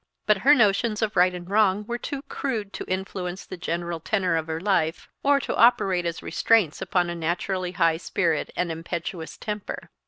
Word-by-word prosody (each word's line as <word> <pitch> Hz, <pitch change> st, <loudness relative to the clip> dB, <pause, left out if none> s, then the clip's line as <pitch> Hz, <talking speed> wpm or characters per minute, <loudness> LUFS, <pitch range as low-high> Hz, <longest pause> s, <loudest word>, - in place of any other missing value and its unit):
But 210 Hz, -2 st, +3 dB
her 285 Hz, +8 st, +6 dB
notions 215 Hz, -1 st, +2 dB
of 215 Hz, -1 st, -1 dB
right 180 Hz, 0 st, +5 dB
and 175 Hz, -1 st, -8 dB
wrong 205 Hz, 0 st, +2 dB
were 240 Hz, +2 st, -3 dB
too 280 Hz, +1 st, -5 dB
crude 220 Hz, -11 st, -4 dB
to -, -, -5 dB
influence 185 Hz, -1 st, -4 dB
the -, -, -7 dB
general 170 Hz, -1 st, -3 dB
tenor 185 Hz, 0 st, 0 dB
of 160 Hz, 0 st, -1 dB
her 160 Hz, 0 st, -3 dB
life, 185 Hz, -4 st, 0 dB
or 285 Hz, 0 st, +4 dB
operate 195 Hz, -7 st, +3 dB
as 170 Hz, -, -4 dB
restraints 210 Hz, -10 st, +2 dB
upon 175 Hz, -2 st, 0 dB
a -, -, -4 dB
naturally 180 Hz, +2 st, -2 dB
high 165 Hz, -3 st, +2 dB
spirit 165 Hz, -2 st, -1 dB
and 180 Hz, -2 st, -1 dB
impetuous 165 Hz, +1 st, -5 dB
temper. 210 Hz, -2 st, -6 dB
185 Hz, 180 wpm, -25 LUFS, 170-210 Hz, -, her